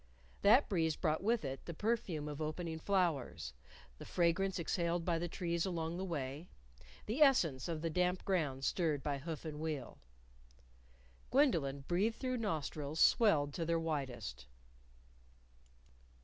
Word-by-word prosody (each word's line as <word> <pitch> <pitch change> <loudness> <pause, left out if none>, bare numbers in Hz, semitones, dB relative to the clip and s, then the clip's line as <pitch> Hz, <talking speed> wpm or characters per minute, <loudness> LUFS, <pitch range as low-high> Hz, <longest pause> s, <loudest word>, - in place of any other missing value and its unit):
That 235 +8 +6
breeze 160 -5 +1
brought 160 -2 0
with 225 -3 +1
it 135 0 -5
the 170 - -6
perfume 205 -8 -1
of 150 +1 -5
opening 160 +1 -3
flowers, 160 - 0 0.5
the - - -7
fragrance 180 +2 +1
exhaled 170 0 -1
by 170 -2 +1
the 175 - -2
trees 170 -1 -1
along 170 -2 -2
the 185 - -3
way, 150 -2 -4 0.6
the 240 +8 -2
essence 170 - +4
of 165 -2 -3
the 165 - 0
damp 180 +2 0
ground 145 -8 0
stirred 155 -6 0
by 140 -2 -1
hoof 160 +2 -6
and 150 -1 -5
wheel. 155 -5 -4 1.3
Gwendolyn 165 - +2
breathed 200 +6 +1
through 255 -1 -2
nostrils 155 -7 -3
swelled 150 -11 +4
to 170 - -2
their 165 0 +1
widest. 130 - -4
165 Hz, 140 wpm, -36 LUFS, 150-185 Hz, 1.3 s, That